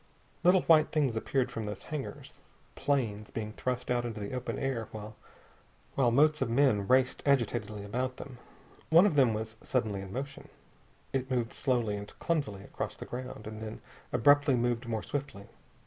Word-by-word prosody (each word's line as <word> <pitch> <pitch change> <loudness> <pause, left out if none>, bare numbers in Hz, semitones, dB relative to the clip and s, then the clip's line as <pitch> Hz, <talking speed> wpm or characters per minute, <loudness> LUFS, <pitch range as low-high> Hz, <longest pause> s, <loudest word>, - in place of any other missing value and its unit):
Little 180 +1 +5
white 155 -2 +6
things 140 -7 +1
appeared 125 +2 0
from 110 -3 -4
those 105 -2 -6
hangars 150 -3 -6 0.3
planes 110 -7 -1
being 110 -1 -5
thrust 125 +1 -2
out 120 -1 +2
into 115 -2 -4
the 100 +4 -5
open 125 -1 -3
air 130 -5 -2
while 110 +4 -5
motes 150 +5 +4
of - - +1
men 115 -5 +3
raced 130 0 +3
agitatedly 115 -6 +1
about 125 +5 -2
them. 130 -3 -9 0.5
One 170 +4 +7
of 190 -7 +2
them 130 -6 +4
was 110 +1 -5
suddenly 110 -6 -1
in 95 -1 -8
motion. 140 +5 -6 0.7
It 130 -1 -1
moved 125 -2 0
slowly 120 -6 0
and 100 0 -8
clumsily 140 -13 -1
across - - -5
the - - -8
ground, 125 -3 -6
and 110 0 -7
then 110 0 -6 0.3
abruptly 145 +1 +5
moved 120 0 0
more 110 -2 -2
swiftly. 135 -8 -4
120 Hz, 165 wpm, -31 LUFS, 110-135 Hz, 0.7 s, One